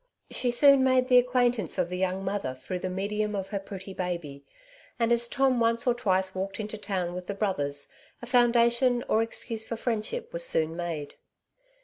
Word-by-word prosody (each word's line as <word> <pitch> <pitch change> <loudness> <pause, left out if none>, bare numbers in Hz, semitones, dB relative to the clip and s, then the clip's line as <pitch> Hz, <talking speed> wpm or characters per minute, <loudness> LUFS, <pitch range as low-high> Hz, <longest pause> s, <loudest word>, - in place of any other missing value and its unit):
She 250 - 0
soon 275 +2 +5
made 255 0 +3
the 250 -1 +8
acquaintance 245 -5 +1
of 170 - 0
the 180 - -4
young 190 +1 -1
mother 195 -9 -2
through 130 +8 -5
the 185 - -3
medium 210 +3 -2
of 195 -1 -4
her 200 -1 -2
pretty 195 -1 -8
baby; 170 -7 -4 0.5
and 230 -1 +1
as 235 0 +2
Tom 260 0 +2
once 230 0 +2
or 245 - +4
twice 190 -5 0
walked 195 +2 -4
into 215 0 -4
town 190 -4 -3
with 180 0 -7
the 200 - -3
brothers, 145 -9 -1 0.3
a - - -8
foundation 240 0 +3
or 220 - +3
excuse 225 0 -3
for 230 - -3
friend 225 -2 -1
ship 480 - -6
was - - 0
soon 160 - +1
made. 165 -4 -5
210 Hz, 195 wpm, -27 LUFS, 185-240 Hz, 0.5 s, the